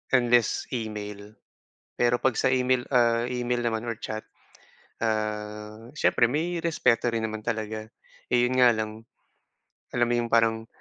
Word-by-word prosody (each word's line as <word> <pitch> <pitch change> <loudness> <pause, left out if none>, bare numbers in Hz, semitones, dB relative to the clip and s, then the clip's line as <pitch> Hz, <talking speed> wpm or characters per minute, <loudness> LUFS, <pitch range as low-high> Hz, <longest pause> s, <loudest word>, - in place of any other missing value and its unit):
unless 120 -2 +3
email. 105 -2 -5 0.6
Pero 120 0 +3
'pag 130 -3 +2
sa - - +3
email, 125 -1 +2
ah, 120 -1 +3
email 125 -1 -1
naman 110 0 -1
or 115 - -2
chat, 110 0 -5 0.8
ah, 105 0 -3
siyempre 120 - +3
may 165 +5 -1
respeto 125 -8 +2
rin 115 -1 -1
naman 110 -1 -3
talaga, 110 -1 -3 0.4
eh, 125 - +4
'yon 130 +1 0
nga 125 -1 +7
lang 110 +1 -5 0.9
alam 120 -1 +2
mo - - +3
yung 120 - -1
parang, 115 -1 +2
115 Hz, 145 wpm, -26 LUFS, 110-120 Hz, 0.9 s, nga